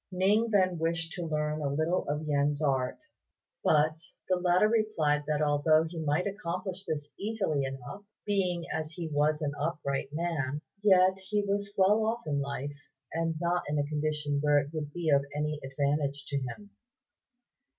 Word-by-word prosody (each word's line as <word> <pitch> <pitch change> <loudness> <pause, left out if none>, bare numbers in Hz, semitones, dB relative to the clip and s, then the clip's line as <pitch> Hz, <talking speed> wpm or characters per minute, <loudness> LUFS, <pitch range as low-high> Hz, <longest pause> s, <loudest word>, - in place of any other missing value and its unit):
Ning 205 +5 +3
then 185 -5 +2
wished 165 0 -1
to 175 -2 -4
learn 150 0 -1
a 140 - 0
little 155 +5 0
of 150 +1 -1
Yen's 145 0 +1
art; 135 -4 0 0.7
but 155 +1 +3 0.3
the 185 - +3
latter 180 +3 +3
replied 165 -10 +1
that 150 0 +1
although 150 +2 +4
he 165 0 -6
might 155 +3 +1
accomplish 190 -1 -4
this 145 -1 -4
easily 195 -10 0
enough, 135 +8 -6 0.2
being 180 -4 0
as 160 0 -3
he 170 -1 -4
was 150 +1 +1
an 145 -1 -1
upright 145 -3 -2
man, 150 -3 -2 0.2
yet 190 -2 +5
he 205 +2 -1
was 200 0 -2
well 205 +3 +4
off 225 0 -1
in 145 -2 0
life, 140 +1 -4 0.4
and 165 0 0
not 175 +1 +1
in 150 - 0
a 145 - +1
condition 150 -1 -1
where 145 0 +4
it 145 +1 0
would 150 -2 -4
be 165 -1 -1
of 140 -1 +5
any 150 0 -1
advantage 140 +1 -1
to 140 - -2
him. 170 - -7
155 Hz, 170 wpm, -30 LUFS, 145-185 Hz, 0.7 s, yet